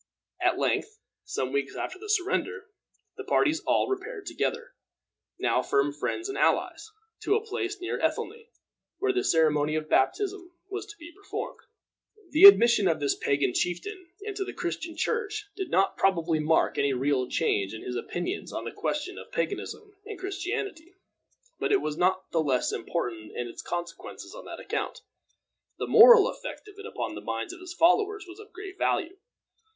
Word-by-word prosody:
At - - +2
length, 435 0 0 0.3
some 130 0 -2
weeks 140 0 -1
after 370 - -5
the 425 +1 -9
surrender, 415 0 0 0.5
the - - -5
parties 315 +1 +2
all - - +3
repaired 400 +2 -4
together, 480 +1 -2 0.6
now - - +2
firm 140 +1 +1
friends 250 - -3
and 400 - -4
allies, - - +1 0.3
to 410 - +1
a 445 0 -1
place 395 -2 -3
near 360 - -3
Ethelney, 460 0 -2 0.5
where 400 -1 +1
the 375 - 0
ceremony 155 -2 +3
of 155 0 -2
baptism 365 - 0 0.2
was 400 +1 -4
to 415 -1 -11
be 335 0 -11
performed. 405 +3 -6 0.7
The 320 +6 +8
admission 235 - +9
of 160 -2 +1
this 145 -1 +1
pagan 140 -3 0
chieftain 360 - -2
into 405 -1 -3
the - - -7
Christian 335 -2 -4
Church 435 -2 -1
did 385 -3 -4
not 195 -6 +2
probably 170 -4 +2
mark 155 +1 +2
any 140 -1 +2
real 130 0 0
change 100 -1 +1
in 110 - -8
his 125 - -4
opinions 175 - -4
on - - -4
the - - -4
question 365 +6 -3
of - - -12
paganism 405 0 -4
and 425 -1 -7
Christianity, 375 -2 -4 0.6
but - - 0
it 405 - +5
was 150 - -3
not 185 +2 +1
the 165 - +2
less 135 -5 +1
important 115 -10 -4
in 120 - -2
its 115 - -8
consequences 175 -1 -6
on - - -10
that - - -8
account. - - -4 0.8
The - - -2
moral 465 -2 +9
effect - - -7
of 410 -1 -14
it 415 - -7
upon - - -4
the - - -7
minds 360 - -4
of 360 - -11
his 360 -1 -8
followers 410 +5 +3
was 355 +3 -11
of 425 - -13
great 390 +1 -9
value. 365 +1 0
360 Hz, 175 wpm, -28 LUFS, -, 0.8 s, admission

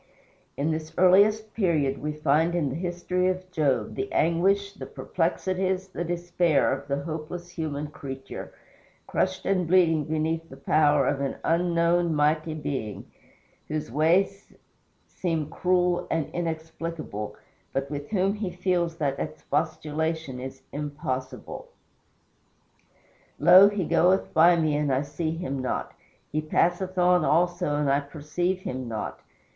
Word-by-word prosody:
In 150 +3 0
this 155 0 -4
earliest 205 +4 +4
period 155 -10 +1
we 150 - -2
find 150 +3 +2
in 155 -5 +1
the 130 - -4
history 180 +1 -1
of 185 0 -2
Job 140 -10 0
the 135 0 -4
anguish, 195 +5 +2
the - - -8
perplexities, 185 +2 -1
the 175 - -4
despair 175 -4 +1
of 140 +1 -6
the 140 0 -2
helpless 165 +2 -6
human 155 -4 -3
creature, 135 -3 -8 0.5
crushed 185 0 -1
and 185 -3 +1
bleeding 165 -4 +4
beneath 160 +1 -1
the - - -11
power 150 -2 +3
of 140 - 0
an 140 - -1
unknown, 170 0 +2
mighty 155 +2 +1
Being, 110 -10 -5 0.6
whose 150 -6 -3
ways 180 - +2 0.5
seem 165 -4 -3
cruel 180 -1 +1
and 160 -3 -1
inexplicable, 160 -8 -4 0.4
but 135 +1 -2
with 145 0 -5
whom 195 -1 +1
he 205 -2 -3
feels 175 -2 0
that 140 -3 -1
expostulation 155 -2 -2
is 130 +1 -8
impossible: 130 -3 -5 1.7
"Lo, 185 +3 +8
he 205 -4 -2
goeth 180 +4 +2
by 170 +2 +6
me 155 -3 +1
and 145 -1 +1
I 130 +2 +1
see 150 +3 -3
him 140 -5 -3
not; 130 - -3 0.4
he 155 - 0
passeth 175 +4 0
on 180 -1 +4
also 170 -2 +2
and 145 -1 0
I 140 +1 +3
perceive 155 +6 -3
him 130 -6 -4
not. 110 -2 -4
160 Hz, 135 wpm, -26 LUFS, 145-180 Hz, 1.7 s, Lo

